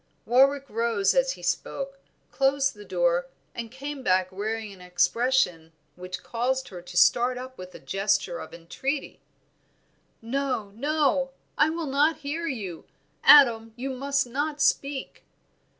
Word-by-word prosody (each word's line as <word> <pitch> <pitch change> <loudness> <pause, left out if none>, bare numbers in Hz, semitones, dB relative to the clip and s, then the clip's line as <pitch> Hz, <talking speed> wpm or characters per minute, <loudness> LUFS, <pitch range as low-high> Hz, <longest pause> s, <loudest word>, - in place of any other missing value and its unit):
Warwick 275 +3 +4
rose 225 -4 +1
as 265 0 +2
he 175 - -14
spoke, 275 +9 -3 0.3
closed 275 0 +2
the 210 -2 -12
door - - +1 0.3
and 235 -1 -6
came 275 +3 -7
back 185 -5 +1
wearing 215 +2 -4
an 185 - -15
expression 180 -2 +1 0.2
which 180 0 -7
caused 260 +3 -1
her 180 -3 -9
to 175 0 -8
start 245 +5 +4
up 255 +1 -8
with 185 -3 -10
a - - -9
gesture 205 - -1
of - - -9
entreaty 265 - -4 1.0
"No 250 -3 -2
no, 280 +2 +1 0.3
I - - +4
will 330 0 -3
not 295 +3 +2
hear 330 +4 -2
you! 200 - -5 0.4
Adam, 225 -6 +7
you 265 +3 -4
must 275 +1 0
not 290 +5 -3
speak!" 280 -2 0
255 Hz, 140 wpm, -26 LUFS, 205-280 Hz, 1.0 s, Adam